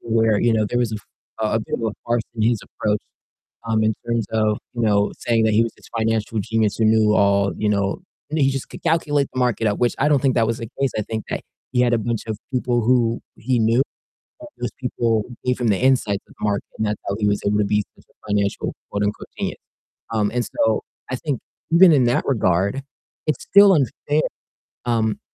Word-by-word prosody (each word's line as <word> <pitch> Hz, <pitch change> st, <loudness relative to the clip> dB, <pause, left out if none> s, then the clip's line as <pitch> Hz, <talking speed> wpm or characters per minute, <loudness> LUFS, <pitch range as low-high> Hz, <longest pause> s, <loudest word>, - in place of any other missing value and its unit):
where, 110 Hz, -2 st, +2 dB
you 120 Hz, -, +3 dB
know, 110 Hz, -2 st, +2 dB
there 120 Hz, -, -1 dB
was 115 Hz, -3 st, 0 dB
a -, -, -2 dB
f 105 Hz, -, -11 dB, 0.4 s
a 110 Hz, -1 st, 0 dB
a 110 Hz, -, 0 dB
bit -, -, -4 dB
of -, -, -3 dB
a 110 Hz, -, -1 dB
farce 120 Hz, -1 st, +1 dB
in 110 Hz, -, -2 dB
his 115 Hz, 0 st, +2 dB
approach, 105 Hz, 0 st, -2 dB, 0.7 s
um, 110 Hz, -1 st, +2 dB
in 110 Hz, 0 st, +2 dB
terms 115 Hz, -2 st, 0 dB
of, 110 Hz, -1 st, +1 dB, 0.2 s
you 120 Hz, -, -2 dB
know, 105 Hz, -2 st, +2 dB
saying 115 Hz, -1 st, +1 dB
that 110 Hz, -, +2 dB
he 110 Hz, -, +5 dB
was 115 Hz, -, -4 dB
this -, -, -18 dB
financial 110 Hz, 0 st, 0 dB
genius 110 Hz, +1 st, 0 dB
who 110 Hz, -, +2 dB
knew 110 Hz, -1 st, +4 dB
all, 100 Hz, -2 st, +3 dB
you 105 Hz, -, 0 dB
know 100 Hz, -, 0 dB, 0.3 s
and 155 Hz, -, 0 dB
he 135 Hz, -2 st, +4 dB
just 135 Hz, -1 st, -4 dB
could -, -, -10 dB
calculate 150 Hz, -4 st, +1 dB
the -, -, -7 dB
market 120 Hz, -3 st, +1 dB
up, 105 Hz, -, 0 dB
which 120 Hz, -1 st, +2 dB
I 140 Hz, -, +3 dB
don't 145 Hz, -3 st, +3 dB
think 135 Hz, -3 st, +2 dB
that 115 Hz, -2 st, +3 dB
was 115 Hz, +1 st, -1 dB
the 115 Hz, -, -5 dB
case 135 Hz, -2 st, +1 dB
I -, -, +1 dB
think 110 Hz, 0 st, -5 dB
that -, -, -2 dB, 0.3 s
he 125 Hz, -, +3 dB
had 120 Hz, -, +3 dB
a -, -, +4 dB
bunch 115 Hz, 0 st, -2 dB
of 110 Hz, -, -3 dB, 0.2 s
people 125 Hz, -1 st, +1 dB
who 115 Hz, 0 st, +2 dB, 0.2 s
he 120 Hz, +2 st, 0 dB
knew, 115 Hz, +3 st, +3 dB, 0.6 s
and 305 Hz, -, -9 dB
those 120 Hz, -, -2 dB
people 115 Hz, -3 st, 0 dB, 0.2 s
gave 125 Hz, 0 st, 0 dB
him 120 Hz, -, +1 dB
the 100 Hz, -, +3 dB
insights 125 Hz, -6 st, +2 dB
of -, -, -18 dB
the -, -, -5 dB
market, 100 Hz, -1 st, 0 dB
and 110 Hz, -, 0 dB
that's 105 Hz, 0 st, -1 dB
how 100 Hz, -, 0 dB
he 105 Hz, -, +1 dB
was 100 Hz, 0 st, 0 dB
able 105 Hz, +1 st, +2 dB
to 105 Hz, -, +3 dB
be 105 Hz, 0 st, +1 dB
such -, -, -21 dB
a -, -, -30 dB
financial 100 Hz, -1 st, 0 dB, 0.2 s
quote 100 Hz, 0 st, -1 dB
unquote 105 Hz, +1 st, -3 dB
"genius." -, -, -3 dB, 0.5 s
Um, 105 Hz, -2 st, +1 dB
and 125 Hz, 0 st, 0 dB
so 110 Hz, -1 st, +1 dB, 0.3 s
I 130 Hz, -, -1 dB
think 140 Hz, -2 st, -3 dB, 0.3 s
even 170 Hz, +1 st, +8 dB
in 135 Hz, -4 st, +4 dB
that 120 Hz, 0 st, +2 dB
regard, 100 Hz, 0 st, +1 dB, 0.4 s
it's 155 Hz, -4 st, -1 dB
still 200 Hz, -1 st, +7 dB
unfair, 145 Hz, +1 st, 0 dB, 0.6 s
um, 110 Hz, -2 st, +1 dB
115 Hz, 235 wpm, -22 LUFS, 105-125 Hz, 0.7 s, even